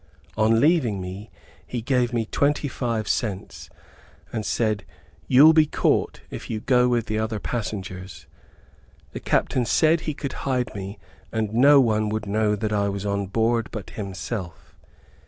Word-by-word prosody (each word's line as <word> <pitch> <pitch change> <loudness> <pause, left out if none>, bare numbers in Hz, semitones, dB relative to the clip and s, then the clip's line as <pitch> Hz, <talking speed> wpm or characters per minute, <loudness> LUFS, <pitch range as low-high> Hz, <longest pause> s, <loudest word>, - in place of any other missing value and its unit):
On 110 +1 +3
leaving 135 - +2
me, 95 +4 -7 0.4
he 125 - -3
gave 125 -1 +1
me 115 -2 -1
twenty 145 +5 0
five 115 -5 -2
cents, 100 -6 -3 0.6
and 110 -2 -2
said, 105 -2 0 0.4
"you'll 145 +5 +7
be 155 -1 +5
caught - - 0
if - - -7
you 110 - -2
go 125 +2 +3
with 120 -2 +1
the 110 0 -2
other 110 0 -2
passengers." 95 -5 -5 0.9
The - - -6
captain 125 - +1
said 160 +7 +3
he 155 -3 -4
could 140 -2 -5 0.2
hide 125 -2 0
me 100 0 -6 0.3
and 110 -2 -2
no 140 +5 +6
one 110 -4 +2 0.2
know 105 +1 +1
that 105 +1 -2
I 100 -1 +1
was 100 0 -4
on 100 -1 -1
board, 115 +3 0
but 105 -4 -7
himself. 95 -2 -6
110 Hz, 155 wpm, -24 LUFS, 100-125 Hz, 0.9 s, you'll